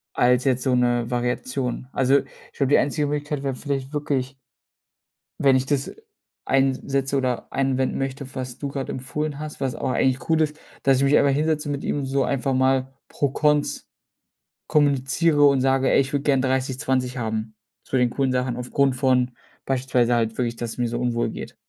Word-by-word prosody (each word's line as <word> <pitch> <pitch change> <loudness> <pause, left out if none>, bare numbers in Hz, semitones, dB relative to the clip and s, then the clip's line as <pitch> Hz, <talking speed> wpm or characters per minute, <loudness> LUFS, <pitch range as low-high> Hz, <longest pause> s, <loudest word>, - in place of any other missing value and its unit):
als 125 0 +3
jetzt 130 -2 +1
so 130 -2 +2
'ne 120 -1 +1
Variation. 125 +1 -2
Also, 135 +1 +3
ich - - -15
glaube, 140 -2 +1
die - - +7
einzige 145 +1 +1
Möglichkeit 145 -1 -3
wäre 135 -2 -2
vielleicht 140 0 -4
wirklich 135 -3 -2 1.0
wenn 135 -2 +4
ich 130 - +1
das, 140 0 0
äh, - - -9 0.5
eins 135 -1 +2
setze 135 0 0
oder 125 -2 -1
anwenden 135 -1 0
möchte, 135 0 -4
was 130 -2 -5
du 140 - -4
grade 135 -1 -4
empfohlen 145 +3 -4
hast, 150 -2 -7
was 130 -2 -1
auch - - -2
eigentlich 130 0 0
cool 160 0 +3
ist, 155 0 -1 0.2
dass 135 -1 +4
ich 135 - +1
mich 140 +2 +4
einfach 140 -1 +4
hinsetze 150 +1 0
mit 140 -1 -3
ihm, 140 -2 -1
so 135 0 +1
einfach 135 0 -1
mal 130 0 +1 0.2
Pro-Cons 150 +1 0 0.8
kommuniziere 145 +1 +2
und 140 -2 +4
sage: 135 0 +2
„Ey, - - +5
ich 135 +1 -2
würde 140 -1 0
gerne 135 -3 +3
30, 130 0 0
20 130 -2 -1
haben, 110 -1 -3 0.3
zu 130 - -2
den 125 -1 +3
coolen 135 -1 0
Sachen. 125 -1 -1
Aufgrund 130 +1 0
von 125 -1 +2 0.3
beispielsweise 125 -2 +1
halt 115 -1 0
wirklich, 120 -2 -1
dass 120 -1 -4
es - - -10
mir 120 -1 0
so 120 +1 -3
unwohl 120 -1 0
geht." - - -8
135 Hz, 190 wpm, -23 LUFS, 125-140 Hz, 1.0 s, die